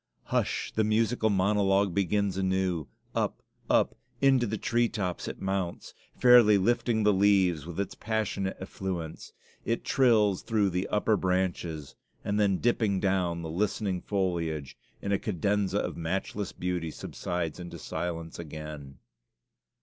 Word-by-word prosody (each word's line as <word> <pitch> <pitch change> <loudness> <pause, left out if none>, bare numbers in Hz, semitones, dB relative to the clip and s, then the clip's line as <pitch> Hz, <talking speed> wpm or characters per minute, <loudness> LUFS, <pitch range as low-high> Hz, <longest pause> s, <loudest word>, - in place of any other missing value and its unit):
Hush! - - -1
the 110 - +2
musical 110 +1 +2
monologue 100 -1 +2
begins 100 +1 +1
anew; 95 -5 0 0.3
up, - - -1 0.3
up - - +3 0.2
into 135 -3 +4
the 110 - -2
tree 120 0 +1
tops 95 -5 -3
it - - -6
mounts, 95 -2 -3 0.2
fairly 120 -4 +7
lifting 110 +2 +1
the 105 0 +5
leaves 95 -5 +3
with 85 +1 -6
its 100 - -2
passionate 105 -3 -2
effluence, 95 -4 -5 0.3
it 115 - -1
trills 110 -7 +3
through 105 -4 +1
the 90 +2 -1
upper 105 +1 +2
branches 90 -5 -1 0.3
and 105 +1 0
then 100 -2 +3
dripping 110 -4 +1
down 90 -4 0
the 80 - -5
listening 95 0 -1
foliage, 85 -8 -2 0.3
in 100 - -2
a 100 - +2
cadenza 100 0 0
of - - -2
matchless 95 +4 -3
beauty, 90 -2 -3
subsides 85 +1 -4
into 85 -1 -7
silence 85 0 -5
again. 75 -4 -8
95 Hz, 135 wpm, -29 LUFS, 85-105 Hz, 0.3 s, fairly